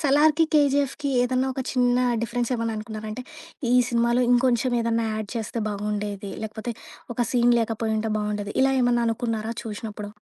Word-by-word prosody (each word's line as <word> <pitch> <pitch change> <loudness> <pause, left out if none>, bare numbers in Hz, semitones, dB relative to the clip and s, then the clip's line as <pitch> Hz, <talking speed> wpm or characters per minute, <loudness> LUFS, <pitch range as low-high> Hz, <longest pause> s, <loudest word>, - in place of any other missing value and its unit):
'సలార్‌కీ', 305 +2 +4
'కేజీఎఫ్‌కీ' 285 -1 +2
ఏదైనా 255 +1 +1
ఒక 265 - -4
చిన్న 245 -1 +2 0.3
డిఫరెన్స్ 235 +1 -1
ఏవన్నా 230 -2 -2
అనుకున్నారా? 215 0 -6
అంటే 220 +4 -5 0.5
ఈ - - +5
సినిమాలో 235 +1 +2
ఇంకొంచెం 245 0 +3
ఏదైనా 230 0 0
ఆడ్ 215 -2 -5
చేస్తే 230 0 -3
బాగుండేది. 205 -1 -3
లేకపోతే 220 +2 -4 0.4
ఒక 240 - +1
సీన్ 245 -1 +4
లేకపోయింటే 220 -1 -1
బాగుండేది. 210 -1 -3
ఇలా 270 - +4
ఏమన్నా 245 -1 +3
అనుకున్నారా 225 -1 -2
చూసినప్పుడు? 210 -1 -6
230 Hz, 145 wpm, -25 LUFS, 215-250 Hz, 0.5 s, ఈ